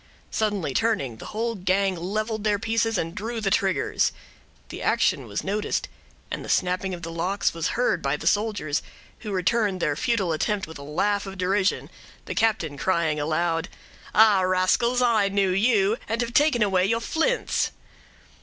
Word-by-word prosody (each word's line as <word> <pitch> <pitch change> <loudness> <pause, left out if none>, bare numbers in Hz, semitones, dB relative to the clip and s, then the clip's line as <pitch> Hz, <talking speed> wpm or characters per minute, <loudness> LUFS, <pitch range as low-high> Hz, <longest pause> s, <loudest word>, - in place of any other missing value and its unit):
Suddenly 205 -10 -1
turning, 140 - 0
the - - -9
whole 230 +2 -2
gang 190 -1 +1
leveled 215 +5 -3
their 210 -1 +2
pieces 225 +1 0
and 165 -1 -2
drew 225 +4 -4
the 200 -3 -1
triggers. 190 0 +1 0.6
The - - -7
action - - +1
was - - -4
noticed, 205 +2 -1 0.4
and - - -4
the - - -8
snapping 185 +1 0
of 170 - -12
the 165 - -5
locks 180 +5 0
was 165 +5 -2
heard 240 -8 +1
by 140 +1 0
the 160 - -9
soldiers, 205 -6 +1 0.4
who 215 - -6
returned 195 +1 +1
their 150 -4 0
futile 195 - 0
attempt 195 +5 -1
with 160 -4 -10
a - - -8
laugh 200 +8 -1
of 195 0 -7
derision, 190 +2 0 0.3
the - - -4
captain 200 -10 0
crying 170 -5 +1
aloud,— 165 +2 0 0.5
"Ah! 215 -3 +6
rascals, 185 +7 +2
I 220 -5 +3
knew 195 -1 +1
you, 205 +1 +3
and 225 +1 -1
have 235 0 -3
taken 290 -5 +4
away 190 -2 +2
your 230 +2 +1
flints." 330 - 0
195 Hz, 170 wpm, -25 LUFS, 175-220 Hz, 0.6 s, Ah